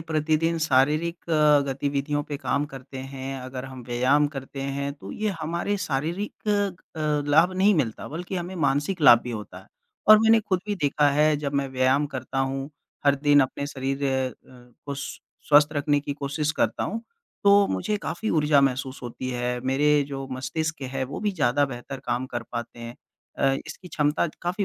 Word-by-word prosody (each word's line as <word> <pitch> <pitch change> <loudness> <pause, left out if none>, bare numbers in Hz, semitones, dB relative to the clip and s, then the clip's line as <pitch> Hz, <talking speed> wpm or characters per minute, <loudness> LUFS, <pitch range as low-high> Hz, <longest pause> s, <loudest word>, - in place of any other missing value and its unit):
प्रतिदिन 160 +1 0
शारीरिक 155 +4 +1
अ, 150 -2 +5
गतिविधियों 140 +2 -1
पे 145 - -5
काम 140 0 -1
करते 135 -1 -10
हैं, 135 0 -6
अगर 130 0 -6
हम 130 -1 -9
व्यायाम 130 +5 +3
करते 135 -1 -7
हैं 140 +1 -3
तो 145 - -10
ये 215 0 -2
हमारे 170 +6 -1
शारीरिक 170 +9 -3 0.5
अ, - - -4 0.3
लाभ 165 +5 +5
नहीं 195 +3 +4
मिलता 125 - -2
बल्कि 180 +5 -5
हमें 175 +1 -4
मानसिक 145 +4 0
लाभ 120 -5 +8
भी 125 - -5
होता 105 -3 -7
है। - - -16 0.4
और 215 0 +10
मैंने 225 0 +5
खुद 185 -3 -1
भी 205 - -1
देखा 145 -4 +2
है 150 +1 +3
जब 145 -1 -3
मैं 140 -1 0
व्यायाम 130 +3 +2
करता 130 -1 -5
हूँ, 135 +1 -1 0.4
हर 140 - +6
दिन 145 +1 +4
अपने 135 +2 -1
शरीर 135 0 -3
अ 130 -1 +1
अ, 125 -1 -18
को 140 - -3
स 140 0 -6 0.3
स्वस्थ 145 0 +7
रखने 145 -1 +1
की 140 0 -4
कोशिश 145 +2 -2
करता - - 0
हूँ 225 - -3 0.4
तो 200 0 +6
मुझे 95 - -1
काफ़ी 200 +4 -3
ऊर्जा 150 -2 +4
महसूस 135 0 0
होती 125 +1 -5
है 125 0 -2
मेरे 145 +3 +3
जो 135 -1 -5
मस्तिष्क 155 +5 -3
है 135 -1 -2
वो 135 +3 -6
भी 210 0 +1
ज़्यादा 145 -5 +2
बेहतर 130 +1 -7
काम 125 +2 -1
कर 120 -2 -4
पाते 120 0 -5
हैं। 115 0 -7 0.4
अ, 135 0 +3
इसकी 180 - -9
क्षमता 150 0 +1 0.2
काफ़ी 180 +4 -1
145 Hz, 185 wpm, -25 LUFS, 135-160 Hz, 0.5 s, और